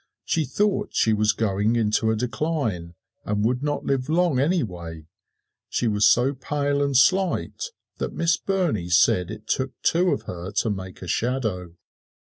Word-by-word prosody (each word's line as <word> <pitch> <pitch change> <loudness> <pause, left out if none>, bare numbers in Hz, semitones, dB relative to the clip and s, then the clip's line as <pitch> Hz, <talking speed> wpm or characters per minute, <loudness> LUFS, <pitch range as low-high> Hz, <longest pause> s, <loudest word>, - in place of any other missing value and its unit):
She 160 -2 0
thought 205 +9 -1
she 110 - +3
was 105 0 +3
going 105 +1 0
into 110 0 +1
a 110 - +2
decline, 115 - -2 0.3
and 105 0 -1
would 125 +2 0
not 145 0 -2
live 135 0 -1
long 165 -4 +2
anyway 90 - -2 0.6
she 120 - 0
was 105 -1 +3
so 125 +3 +3
pale 145 +1 -1
and 140 -2 +2
slight 185 - +2 0.3
that - - -2
Miss 165 -1 +1
Burney 170 - -1
said 90 0 +3
it - - -8
took 130 0 -2
two 180 +2 +3
of - - -1
her 90 +1 -6
to 110 - +1
make 95 -2 -7
a - - -7
shadow. 110 -8 -2
120 Hz, 160 wpm, -24 LUFS, 100-145 Hz, 0.6 s, she